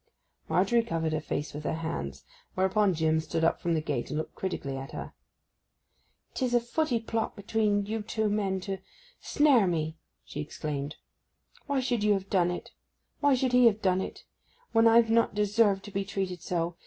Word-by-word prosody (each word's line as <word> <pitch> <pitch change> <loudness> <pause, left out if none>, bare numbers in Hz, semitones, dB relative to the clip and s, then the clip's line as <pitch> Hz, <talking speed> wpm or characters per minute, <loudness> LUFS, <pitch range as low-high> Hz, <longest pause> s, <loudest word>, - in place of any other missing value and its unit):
Margery 235 -1 +3
covered 165 -8 -2
her 155 - -1
face 145 -1 -3
with 150 +1 -6
her 160 - -1
hands; 70 - -5 0.3
whereupon 190 0 +2
Jim 160 0 +2
stood 160 +1 -2
up 165 - +2
from 170 -1 +1
the 155 - 0
gate 145 -5 -3
and - - -2
looked 155 - -4
critically 155 -7 -4
at 135 0 -7
her. - - -6 1.2
''Tis 250 -2 0
a - - +6
footy 240 +1 0
plot 225 0 -2
between 205 -1 0
you 220 +2 -3
two 220 0 -1
men 200 -2 0
to—snare 270 - 0
me!' 160 -2 -2 0.3
she 145 - -5
exclaimed. 150 -1 -4 0.7
'Why 280 -2 +1
should 245 -4 0
you 210 0 +4
have 195 -1 -3
done 180 -3 +3
it—why 275 +9 -3
should 255 0 0
he 250 -1 +7
have 215 -1 +1
done 185 -1 +3
it—when 230 - -2
I've 230 0 +5
not 230 -2 +3
deserved 205 -1 +2
to 205 - -9
be 195 0 -1
treated 190 -3 -3
so. 170 -1 -2
195 Hz, 175 wpm, -29 LUFS, 165-225 Hz, 1.2 s, he